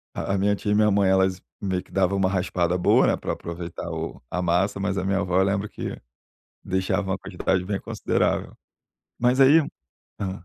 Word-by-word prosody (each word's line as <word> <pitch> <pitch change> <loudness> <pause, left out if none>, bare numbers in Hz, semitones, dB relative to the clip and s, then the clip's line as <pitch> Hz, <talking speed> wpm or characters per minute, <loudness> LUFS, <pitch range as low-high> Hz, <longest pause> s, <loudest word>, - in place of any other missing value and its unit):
A 100 - -2
a - - +1
minha 100 +1 +2
tia 105 - -3
e - - +3
minha 105 0 +4
mãe, 100 -1 +3
elas 95 -1 +2 0.2
meio 95 -2 -1
que - - -23
dava 95 0 +1
uma 95 -1 +2
raspada 90 -2 0
boa, 90 - +4
né, - - +3
pra - - -3
aproveitar 85 0 -6
o 80 0 -5
a 90 - -2
massa, 90 +3 +1
mas 95 0 -1
a 95 - -1
minha 95 0 +1
avó, 90 -1 +1
eu - - +5
lembro 100 +2 -1
que - - -6 0.6
deixava 95 +1 -1
uma 95 - -1
quantidade 95 -1 -1
bem 100 +1 -2
considerável. - - -1 0.7
Mas 125 +2 +2
aí 140 +4 +8 0.6
hã. 95 -2 -4
95 Hz, 200 wpm, -24 LUFS, 90-100 Hz, 0.7 s, aí